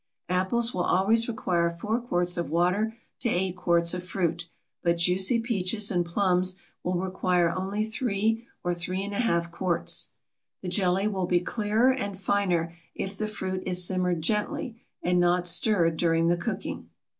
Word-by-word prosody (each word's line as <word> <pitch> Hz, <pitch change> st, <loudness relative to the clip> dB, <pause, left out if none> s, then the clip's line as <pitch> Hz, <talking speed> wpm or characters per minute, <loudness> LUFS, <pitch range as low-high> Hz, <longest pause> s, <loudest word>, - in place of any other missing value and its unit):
Apples 190 Hz, +7 st, +1 dB
will 180 Hz, -, -1 dB
always 210 Hz, +6 st, +3 dB
require 175 Hz, -7 st, 0 dB
4 210 Hz, +8 st, -2 dB
quarts 175 Hz, -6 st, 0 dB
of 170 Hz, -4 st, -3 dB
water 180 Hz, +7 st, +1 dB, 0.2 s
to 240 Hz, -, -1 dB
8 185 Hz, -2 st, 0 dB
quarts 170 Hz, -1 st, +2 dB
of 180 Hz, 0 st, -4 dB
fruit, 170 Hz, -2 st, -2 dB, 0.3 s
but 170 Hz, 0 st, +1 dB
juicy 185 Hz, +7 st, +3 dB
peaches 215 Hz, -2 st, +1 dB
and 175 Hz, -2 st, +2 dB
plums 185 Hz, +1 st, +1 dB, 0.3 s
will 180 Hz, +1 st, -1 dB
require 180 Hz, -1 st, +1 dB
only 195 Hz, +4 st, -2 dB
3 225 Hz, 0 st, -1 dB, 0.2 s
or 175 Hz, -, 0 dB
3½ 180 Hz, 0 st, -1 dB
quarts. 175 Hz, 0 st, 0 dB, 0.5 s
The 180 Hz, -, -3 dB
jelly 190 Hz, +1 st, +2 dB
will 190 Hz, -4 st, -1 dB
be 175 Hz, -1 st, +3 dB
clearer 220 Hz, +6 st, +1 dB
and 200 Hz, -7 st, -4 dB
finer 180 Hz, -4 st, 0 dB, 0.2 s
if 195 Hz, +1 st, -4 dB
the 215 Hz, +2 st, -2 dB
fruit 190 Hz, -3 st, -4 dB
is 180 Hz, -1 st, +3 dB
simmered 180 Hz, -3 st, 0 dB
gently 220 Hz, +4 st, -1 dB, 0.2 s
and 180 Hz, 0 st, +2 dB
not 175 Hz, 0 st, +2 dB
stirred 170 Hz, -3 st, +3 dB
during 165 Hz, 0 st, +2 dB
the 175 Hz, -, +2 dB
cooking. 195 Hz, +2 st, -5 dB
185 Hz, 155 wpm, -27 LUFS, 175-210 Hz, 0.5 s, always